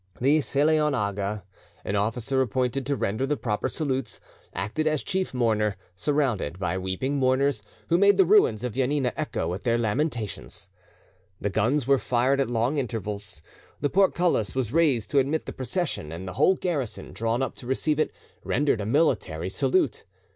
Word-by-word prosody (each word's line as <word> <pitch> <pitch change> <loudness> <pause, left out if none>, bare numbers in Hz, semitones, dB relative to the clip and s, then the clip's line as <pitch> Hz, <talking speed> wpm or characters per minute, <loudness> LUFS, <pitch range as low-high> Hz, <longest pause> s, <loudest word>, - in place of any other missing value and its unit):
The 140 +5 +4
Selaon 150 +1 +2
Aga, 100 -2 -2 0.4
an 100 - -1
officer 115 +6 0
appointed 130 +2 -1
to 140 - +1
render 110 +3 -1
the 150 +1 0
proper 110 -4 -1
salutes, 135 -5 -2 0.3
acted 110 - -2
as 155 -6 +1
chief 185 +6 -1
mourner, 110 -5 +1 0.2
surrounded 125 - 0
by 90 -2 -1
weeping 95 +10 -2
mourners, 130 -2 +2 0.3
who 170 +1 +4
made 200 0 +5
the 190 - +6
ruins 165 - +4
of 125 -3 -2
Janina 130 -1 0
echo 80 - -2
with 90 +3 -3
their 120 -1 +1
lamentations. 110 -4 -2 0.7
The 100 - -2
guns 120 +7 +1
were 135 0 +4
fired 125 +4 +2
at 135 - -1
long 120 +5 +1
intervals. 105 - -4 0.4
The 145 - 0
portcullis 180 - +2
was 125 -3 -1
raised 145 -10 +2
to 140 - +4
admit 145 +4 0
the - - -6
procession, 135 - -3
and 85 +3 -6
the 90 - -5
whole 190 - +4
garrison, 150 - -3
drawn 115 +3 0
up - - -3
to 120 - -10
receive 150 +3 0
it, - - +1 0.3
rendered 140 -4 +1
a 100 - -3
military 110 - +1
salute. 135 - +1
130 Hz, 170 wpm, -26 LUFS, 105-145 Hz, 0.7 s, the